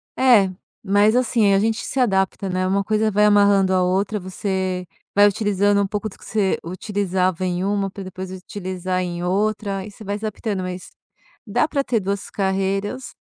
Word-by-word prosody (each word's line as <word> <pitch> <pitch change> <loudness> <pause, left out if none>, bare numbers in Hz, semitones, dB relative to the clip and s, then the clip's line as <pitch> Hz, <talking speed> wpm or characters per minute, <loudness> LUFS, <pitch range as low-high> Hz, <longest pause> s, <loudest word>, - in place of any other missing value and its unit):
Eh, 235 -7 +5 0.3
mas, 205 +2 +3
assim, 230 -5 +3
a 195 - +4
gente 225 +2 0
se 270 - -3
adapta, 195 -4 +1
né, 185 0 0
uma 195 +1 +1
coisa 215 +1 +1
vai 210 +1 +4
amarrando 200 -2 +4
a 185 -1 +3
outra, 195 +3 0
você 185 -1 -3 0.3
vai 205 +1 +7
utilizando 205 -1 +2
um 200 - 0
pouco 210 +1 -3
do - - -16
que - - -16
você 205 -3 0
utilizava 185 0 -1
em 180 0 -1
uma, 200 0 0
pra 195 - -8
depois 185 0 -7
utilizar 185 -1 -4
em 175 -1 -4
outra, 200 +1 -1
e 210 - -9
você 210 - -13
vai 200 0 -3
adaptando, 210 -2 -3
mas 185 0 -6 0.6
dá 245 +8 +1
pra 280 -3 -1
ter 230 -4 0
duas 195 0 -3
carreiras, 195 +5 -2
195 Hz, 180 wpm, -21 LUFS, 185-210 Hz, 0.6 s, vai